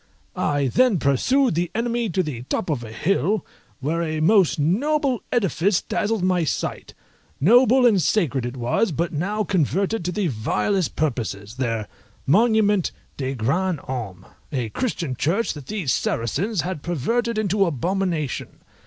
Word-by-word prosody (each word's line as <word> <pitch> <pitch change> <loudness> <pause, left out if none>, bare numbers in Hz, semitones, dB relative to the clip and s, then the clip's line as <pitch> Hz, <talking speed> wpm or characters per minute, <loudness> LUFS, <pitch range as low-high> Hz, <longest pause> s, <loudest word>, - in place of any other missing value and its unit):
I 145 -1 0
then 220 - +3
pursued 235 - +2
the 170 +1 0
enemy 235 0 0
to 185 +1 0
the 140 -7 -5
top 175 - -1
of 130 -5 -2
a 110 - -8
hill, 195 - 0 0.4
where 160 +5 -1
a 155 -2 -2
most 185 +2 +4
noble 260 - +1
edifice 195 - +2
dazzled 210 -2 -1
my 180 -2 +2
sight; 155 - -3 0.4
noble 245 - +5
and 210 -6 +5
sacred 145 - +1
it 120 +2 -5
was 125 - +1
but 170 +3 -2
now 200 +8 -1
converted 190 +3 0
to 180 - 0
the 200 +2 -1
vilest 150 - 0
purposes, 115 -7 -3
their 115 -5 -2 0.4
monument 210 - +3 0.2
de 135 -1 -3
grands 160 +8 0
hommes, 105 -8 -6 0.3
a 125 -6 -2
Christian 165 - -2
church 190 - 0
that 145 -4 -10
these 185 - -1
Saracens 160 - -1
had 175 -1 -4
perverted 230 - -1
into 205 -1 +2
abomination. 170 -1 -2
175 Hz, 145 wpm, -23 LUFS, 135-210 Hz, 0.4 s, noble